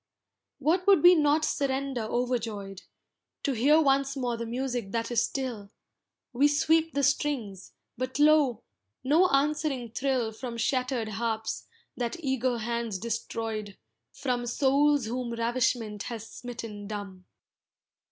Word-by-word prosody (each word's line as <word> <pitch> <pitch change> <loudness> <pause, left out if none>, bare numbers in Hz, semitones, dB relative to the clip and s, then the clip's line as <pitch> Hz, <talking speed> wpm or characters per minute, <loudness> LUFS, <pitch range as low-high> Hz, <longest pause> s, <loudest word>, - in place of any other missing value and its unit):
What 330 +7 +1
would 390 -6 +6
we 355 +1 +10
not 305 -1 +3
surrender 275 -3 -1
overjoyed, 220 -4 -2 0.6
To 280 - +1
hear 275 +6 +4
once 275 -2 +2
more 245 -2 -1
the 230 0 -5
music 245 -3 -3
that 230 +1 -2
is 235 -2 +3
still; 240 -7 -4 0.6
We 275 +4 +4
sweep 320 +2 +2
the 280 - +1
strings, 265 -9 -1 0.3
but 255 +1 -3
lo! 295 -6 +4 0.4
no 315 +8 +4
answering 275 -4 0
thrill 255 -3 0
From 235 +1 -6
shattered 250 -2 0
harps, 220 +1 -3 0.3
that 240 -2 -2
eager 260 -4 0
hands 235 -2 -2
destroyed, 225 -1 -4 0.3
From 245 -3 -2
souls 280 +2 +3
whom 240 +1 -3
ravishment 230 -2 0
has 225 -1 -6
smitten 230 -5 -8
dumb. 200 -3 -7
245 Hz, 125 wpm, -28 LUFS, 225-280 Hz, 0.6 s, we